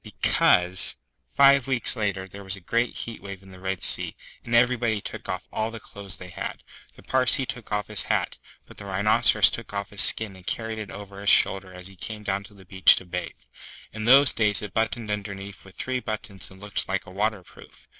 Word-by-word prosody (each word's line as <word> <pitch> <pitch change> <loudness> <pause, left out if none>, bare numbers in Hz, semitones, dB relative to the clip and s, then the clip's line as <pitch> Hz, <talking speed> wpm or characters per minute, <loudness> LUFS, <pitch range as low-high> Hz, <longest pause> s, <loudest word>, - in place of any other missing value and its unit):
Because, 90 +1 +3 0.3
five 140 - +5
weeks 130 -3 +2
later, 100 -4 -2
there 100 +2 -11
was 95 0 -4
a 115 +6 0
heat 115 -1 -7
wave 100 -1 -9
in 95 - -15
the 95 - -13
Red 95 0 -4
Sea, - - +1 0.3
and 115 - -2
everybody 120 -2 +2
took - - -8
off - - -4
all 110 +1 -1
the 115 0 -8
clothes 100 -2 -9
they 90 - -10
had. - - -6 0.3
The - - -17
Parsee 130 +1 +3
took 125 -4 -8
off 105 0 -1
his 105 -2 +2
hat; - - -1 0.3
but - - -16
the - - -9
Rhinoceros 100 +2 +4
took - - -6
off 100 0 -4
his 100 -1 +2
skin 110 -3 +3
and 90 -1 -17
carried 110 -1 -3
it 105 - -7
over 100 0 -10
his 100 - +2
shoulder 95 0 +4
as 90 0 -11
he 95 0 -11
came 105 +3 -8
down 100 -1 -2
to 105 - -14
the 95 -1 -16
beach 95 0 +6
to 95 - -5
bathe. 90 0 -6 0.5
In 110 0 -5
those 135 +3 +7
days 105 -3 +1
it 105 - -7
buttoned 110 0 -1
underneath 100 -1 -6
with 95 -2 -16
three 130 +4 -2
buttons 110 -4 -6
and 95 - -16
looked 105 0 -3
like 95 0 -2
a - - -12
waterproof. 100 -1 -5
100 Hz, 215 wpm, -25 LUFS, 95-110 Hz, 0.5 s, those